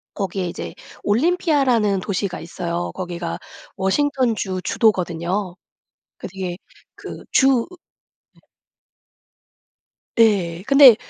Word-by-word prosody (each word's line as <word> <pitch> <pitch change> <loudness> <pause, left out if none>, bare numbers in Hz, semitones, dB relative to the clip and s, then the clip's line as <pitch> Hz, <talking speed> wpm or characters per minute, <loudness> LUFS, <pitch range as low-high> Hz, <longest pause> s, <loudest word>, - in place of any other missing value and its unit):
거기에 190 -2 -2
이제 - - -6 0.3
올림피아라는 255 - +2
도시가 190 -1 -2
있어요. 170 +1 -4
거기가 175 -2 -4 0.4
워싱턴주 220 -3 0
주도거든요. 180 -3 0 0.6
그게 185 -2 -5 0.4
그 - - -8
주의 270 0 +5 0.8
네. - - -25 1.8
네. 190 -7 +3
근데 275 -4 +9
195 Hz, 205 characters per minute, -21 LUFS, 180-245 Hz, 1.8 s, 근데